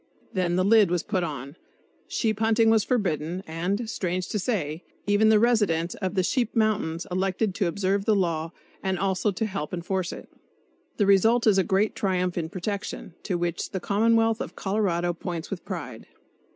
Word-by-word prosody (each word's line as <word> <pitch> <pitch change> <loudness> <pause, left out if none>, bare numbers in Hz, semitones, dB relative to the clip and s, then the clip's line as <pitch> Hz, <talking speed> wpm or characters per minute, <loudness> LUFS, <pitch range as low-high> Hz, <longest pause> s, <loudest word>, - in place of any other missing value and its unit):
Then 180 -2 0
the 185 +1 +2
lid 210 -2 +6
was 175 -1 0
put 190 -4 -1
on, 140 -3 -5 0.5
sheep 220 -3 -1
hunting 225 0 +4
was 220 -2 +4
forbidden, 180 - -1
and, 180 +8 -2
strange 185 -4 -2
to 210 - -1
say, 175 -7 -2 0.2
even 205 +2 +4
the 220 - +6
residents 205 -8 +2
of 190 0 -4
the 185 - +2
sheep 240 +3 0
mountains 210 -7 +1
elected 190 +2 0
to 200 -1 0
observe 195 +3 0
the 215 -1 +3
law, 165 -4 0 0.3
and 190 -1 -1
also 190 +2 +1
to 205 +3 -1
help 190 -6 -4
enforce 180 +1 -2
it! - - -9 0.7
The 205 - +3
result 220 +5 +4
is 205 -3 +5
a - - +4
great 195 +4 +1
triumph 180 -2 0
in 165 -2 -2
protection, 195 -1 -5
to 180 - -2
which 175 -1 -2
the 190 - -3
commonwealth 225 +3 +2
of - - -6
Colorado 185 -4 0
points 170 -1 -5
with 195 - -4
pride. 145 - -6
190 Hz, 180 wpm, -26 LUFS, 175-215 Hz, 0.7 s, lid